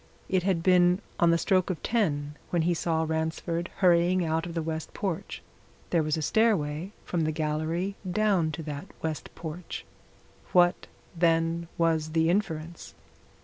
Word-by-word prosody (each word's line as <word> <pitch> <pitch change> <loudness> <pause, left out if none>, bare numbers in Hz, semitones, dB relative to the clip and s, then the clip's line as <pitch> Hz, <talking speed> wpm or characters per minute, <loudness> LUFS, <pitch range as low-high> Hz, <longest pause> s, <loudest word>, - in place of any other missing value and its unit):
It 185 -1 +2
had 180 -3 0
been 180 0 +5 0.2
on 170 - +5
the 170 - +4
stroke 185 +2 +2
of 185 - -3
ten 150 -11 0 0.2
when 170 -2 +1
he 175 +2 +2
saw 160 -1 0
Ransford 160 +2 -2
hurrying 175 0 +4
out 160 +1 0
of 170 - -7
the 165 - -1
west 160 0 -4
porch. 190 -5 -4 0.5
There 170 - +3
was 155 0 0
a 155 - -2
stairway 180 -5 +1
from 175 - -1
the 155 0 +1
gallery 160 +5 -1 0.2
down 190 -5 +2
to 160 - -5
that 145 -2 -6 0.2
west 160 -2 -3
porch. 165 +1 -6 0.7
What, 175 0 +4 0.3
then, 165 0 +2
was 160 -2 +1
the 165 +1 +3
inference? 170 -4 -3
165 Hz, 155 wpm, -28 LUFS, 160-180 Hz, 0.7 s, been